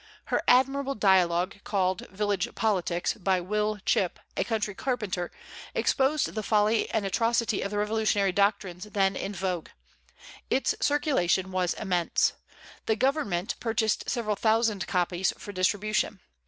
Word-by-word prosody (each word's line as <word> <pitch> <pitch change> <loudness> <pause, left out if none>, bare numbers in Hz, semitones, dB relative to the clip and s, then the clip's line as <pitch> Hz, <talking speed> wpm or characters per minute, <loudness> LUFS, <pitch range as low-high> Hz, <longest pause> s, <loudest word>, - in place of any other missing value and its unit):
Her - - +3
admirable 270 +2 +3
dialogue, 185 -2 +2
called 185 -3 -1
"Village 200 -1 -2
Politics," 185 -5 0
by 190 -2 0
Will 210 +3 -1
Chip, 185 -3 +1 0.2
a - - +1
country 215 -3 -2
carpenter, 210 -7 -2 0.5
exposed 275 +2 +1
the 215 - -2
folly 215 +1 +2
and 220 -3 -1
atrocity 230 +1 +1
of 200 - -2
the 205 - -3
revolutionary 210 -2 +1
doctrines 200 -1 0
then 195 -2 +1
in 195 - -3
vogue. 180 -2 -3 0.8
Its 265 - +2
circulation 190 - +1
was 185 -1 0
immense. 180 -5 +1 0.5
The 220 - +3
Government 225 - 0
purchased 225 -2 0
several 220 -5 -1
thousand 220 -2 +1
copies 180 0 0
for 205 - -8
distribution. 205 +2 0
205 Hz, 130 wpm, -27 LUFS, 185-225 Hz, 0.8 s, Her